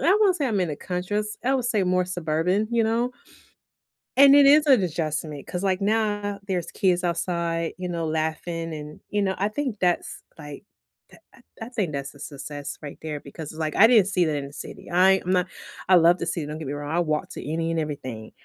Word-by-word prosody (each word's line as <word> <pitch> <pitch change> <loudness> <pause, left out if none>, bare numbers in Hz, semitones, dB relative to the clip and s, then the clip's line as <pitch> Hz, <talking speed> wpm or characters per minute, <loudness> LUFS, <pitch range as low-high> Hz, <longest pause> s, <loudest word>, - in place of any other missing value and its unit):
I 380 +5 +4
won't 390 -4 +4
say 290 -5 0
I'm 210 -5 0
in 175 - 0
a 145 - -4
country, 180 +4 -3
just 210 0 -4
I 265 +2 +2
would 255 -3 0
say 215 -5 +1
more 180 0 +2
suburban, 180 +3 0
you 235 -1 +2
know, 230 +3 +1 1.1
and 280 0 +8
it 285 - +7
is 295 +2 +7
an 255 -8 +6
adjustment. 155 -3 -3
'Cause, 180 +1 -4
like, 190 0 +1
now 205 -1 0
there's 180 -4 -2
kids 180 -3 +1
outside, 170 -1 -1
you 180 -1 -4
know, 170 -1 -2
laughing 160 +1 -2
and, 150 0 -9
you 205 - 0
know, 190 -1 0
I 200 - +2
think 255 -3 -3
that's, 175 -1 0 0.2
like, 145 +1 -9 0.5
uh - - -15 0.2
uh - - -19 0.2
I - - -10
think 205 -10 -2
that's 140 0 -4
a - - -15
success 140 0 -7
right 145 -2 -8
there 155 -2 -4
because 145 +2 -9
it's, 155 - -11
like, 155 -1 -2
I 220 - +8
didn't 225 -6 +5
see 185 -3 +2
that 155 -2 0
in 140 -1 -4
the 140 - -14
city. - - -9
I 190 +2 +5
am 185 +1 +2
a 180 - +2 0.4
I 185 - +8
love 170 +1 +6
the - - -2
city, 160 -1 -2
don't 150 +1 -6
get 155 - -6
me 140 - -3
wrong. 145 0 -5
I - - +2
walked 155 -3 -2
to - - -7
any 165 +2 -1
and 165 - 0
everything, 130 -8 -5
175 Hz, 235 wpm, -25 LUFS, 155-205 Hz, 1.1 s, and